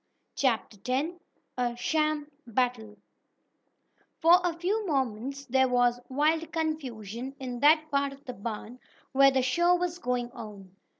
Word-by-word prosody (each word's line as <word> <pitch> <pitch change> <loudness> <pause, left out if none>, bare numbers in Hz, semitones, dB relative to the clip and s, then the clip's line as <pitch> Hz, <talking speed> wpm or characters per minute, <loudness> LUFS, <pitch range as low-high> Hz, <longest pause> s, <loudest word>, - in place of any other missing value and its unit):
CHAPTER 230 -5 0
X 275 +5 +1 0.5
A 240 -1 0
SHAM 305 +2 0 0.2
BATTLE 230 -3 -1 1.2
For 345 +3 +6
a 345 -2 -1
few 395 +6 0
moments 270 -1 -2
there 265 +1 +3
was 245 -1 +3
wild 310 +4 +1
confusion 265 - -4
in 250 -2 -5
that 310 +3 +4
part 280 0 +1
of 275 +1 -14
the 250 - -5
barn 225 +3 -6 0.3
where 275 +1 +6
the 265 -1 +1
"show" 345 +8 +3
was 355 0 -2
going 245 -4 -2
on. 205 -6 -10
265 Hz, 135 wpm, -28 LUFS, 240-310 Hz, 1.2 s, For